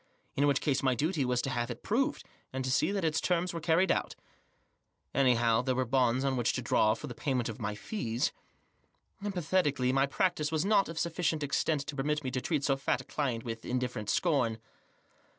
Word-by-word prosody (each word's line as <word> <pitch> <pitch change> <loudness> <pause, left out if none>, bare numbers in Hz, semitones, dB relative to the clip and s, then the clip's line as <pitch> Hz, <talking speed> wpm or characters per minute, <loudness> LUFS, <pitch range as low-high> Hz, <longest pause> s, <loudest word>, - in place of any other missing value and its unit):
In 145 +1 +3
which 140 -2 +2
case 140 -4 +1
my 130 -2 +2
duty 155 +4 0
was 125 -1 0
to 135 - -2
have 120 -1 -1
it 120 -1 -7
proved, 255 +6 0 0.3
and 130 0 -3
to 130 - -1
see 155 +7 +2
that 200 -1 -1
to 160 -2 +1
terms 175 +2 0
were 165 - -4
carried 170 +4 +3
out. - - -1 1.0
Anyhow, 120 -4 +3
there 130 0 0
were 130 - +1
the 120 - -11
bonds 130 0 +2
oft 135 -1 +1
which 120 -1 +1
to 130 - -2
draw 110 -2 +3
for 150 - -8
payment 125 -2 -1
of 115 +2 -7
my 105 -1 -2
fees. 115 - -2 0.9
Emphatically, 165 -9 +1
my 135 +1 +3
practice 155 0 0
was 160 +2 0
not 200 -3 +3
of 165 - -7
sufficient 165 -2 0
extent 145 +1 0
to 145 0 -6
permit 150 +2 -1
me 130 - -3
to 130 - -2
treat 150 -2 -1
so 135 -1 +2
fat 135 - 0
a - - -12
client 125 -6 -2
with 115 -1 -5
indifferent 125 -4 -2
scorn. 125 - +1
135 Hz, 205 wpm, -31 LUFS, 125-160 Hz, 1.0 s, In